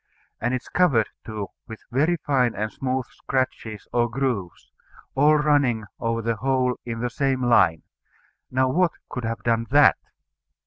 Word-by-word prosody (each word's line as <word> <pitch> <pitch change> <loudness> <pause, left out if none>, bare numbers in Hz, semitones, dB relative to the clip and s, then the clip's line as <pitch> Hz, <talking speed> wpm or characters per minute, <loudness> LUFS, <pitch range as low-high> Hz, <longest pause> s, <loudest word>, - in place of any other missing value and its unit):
And 120 +3 0
it 130 - -4
is - - -18
covered, 135 -12 +2
too, 105 -2 -5 0.2
with 110 -2 -10
very 155 +8 +2
fine 130 -5 +2
and 105 +2 -2
smooth 130 -1 -2
scratches 115 -5 -3
or 120 -1 +2
grooves, 115 -8 -3 0.4
all 150 +3 +5
running 145 -7 +2
over 115 0 -1
the 115 0 -1
whole 130 +1 0
in 115 -1 -5
the 125 - -1
same 135 0 0
line. 95 -9 +4 0.7
Now 130 +1 +2
what 175 +4 +2 0.2
could 125 -2 -4
have 115 0 -4
done 115 0 +1
that? 145 +2 +6
125 Hz, 155 wpm, -24 LUFS, 115-135 Hz, 0.7 s, that